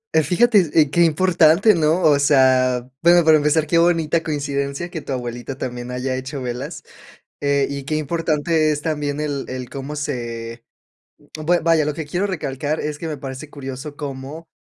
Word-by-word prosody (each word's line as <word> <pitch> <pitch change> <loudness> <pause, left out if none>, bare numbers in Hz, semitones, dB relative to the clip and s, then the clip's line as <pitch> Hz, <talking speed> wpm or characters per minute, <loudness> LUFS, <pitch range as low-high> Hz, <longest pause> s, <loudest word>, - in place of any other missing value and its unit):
Eh, 160 - +6
fíjate, 195 0 +3
eh, 150 -2 +3
qué 170 +2 +4
importante, 170 +4 +4
¿no? 165 +2 +1
O 145 -3 +5
sea, 130 -3 +3
bueno, 170 0 +5
para 160 -1 +7
empezar, 150 +1 +2
qué 165 +2 +2
bonita 165 -1 +2
coincidencia 140 +1 -3
que 160 - -5
tu - - -8
abuelita 120 +1 -5
también 125 -1 -5
haya 130 +1 -2
hecho 130 +2 -5
velas. 125 +6 -5 0.6
Eh, 140 -1 +1
y 140 -1 -5
qué 155 - -3
importante 155 0 0
es 145 0 -4
también 150 -2 -2
el 145 -2 -3
el 125 -1 -6
cómo 140 +2 -6
se 115 -5 -5 0.7
bue 170 +3 +1
vaya, 165 -2 +3
lo 150 -1 -2
que 160 -1 -5
quiero 180 +7 -1
recalcar 150 -4 -3
es 150 0 -4
que 165 - -6
me 155 -2 -4
parece 135 +2 -8
curioso 135 +1 -7
cómo, 145 +3 -7
150 Hz, 175 wpm, -20 LUFS, 135-160 Hz, 0.7 s, para